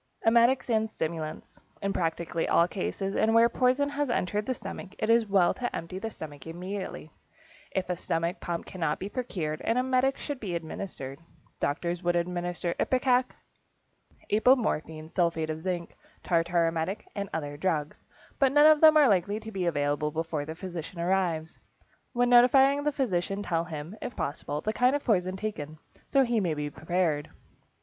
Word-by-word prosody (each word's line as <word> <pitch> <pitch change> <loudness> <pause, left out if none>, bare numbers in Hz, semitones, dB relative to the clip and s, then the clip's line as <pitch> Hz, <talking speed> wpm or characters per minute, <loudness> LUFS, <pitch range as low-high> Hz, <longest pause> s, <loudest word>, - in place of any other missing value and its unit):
=Emetics 235 +3 +4
and 220 -2 +1
Stimulants.= 160 -4 -5 0.2
In 200 0 -1
practically 165 0 -1
all 170 - +4
cases, 195 +1 -3
and 225 +1 +3
where 230 +1 +7
poison 255 +4 +2
has 290 -1 -1
entered 210 -2 -1
the 260 - +1
stomach, 200 -3 -8
it 215 - +1
is 230 -1 +4
well 195 -3 +4
to 245 -1 -4
empty 175 +3 -5
the 225 - -4
stomach 150 -7 -9
immediately. 180 -1 -6 0.6
If 190 -1 -2
a 180 - -1
stomach 170 +2 -2
pump 170 -2 -4
cannot 165 -5 -2
be 195 - -5
procured, 175 -11 -3
an 230 - 0
emetic 260 +1 +2
should 290 -3 -5
be 190 -7 -4
administered. 160 -5 -6 0.4
Doctors 170 +4 -1
would 175 -1 +1
administer 175 0 -1
ipecac, 255 -1 +3 1.1
apomorphine, 210 - +2
sulphate 165 -3 0
of 155 - -5
zinc, 175 0 -4 0.3
tartar 170 0 +2
emetic, 165 +4 -2
and 200 -1 -4
other 145 -2 -4
drugs, 155 -2 -2 0.4
but 270 -2 +4
none 295 +1 +6
of 310 -1 +7
them 310 -1 +8
are 295 -2 +7
likely 200 0 +2
to 220 0 -9
be 190 -4 -2
available 145 -1 0
before 160 -1 -3
the 160 +1 -6
physician 175 -1 -7
arrives. 170 -3 0 0.5
When 245 0 +2
notifying 270 +4 +6
the 295 - +3
physician 200 -7 -1
tell 165 -3 0
him, 160 +3 -7
if - - -5
possible, 145 +1 -3
the 215 - -1
kind 250 +4 +3
of 290 - -2
poison 185 -5 +1
taken, 155 -8 -5 0.3
so 275 - +4
he 240 -2 +1
may 175 -6 0
be 150 0 -3
prepared. 160 -2 -1
185 Hz, 170 wpm, -28 LUFS, 165-230 Hz, 1.1 s, them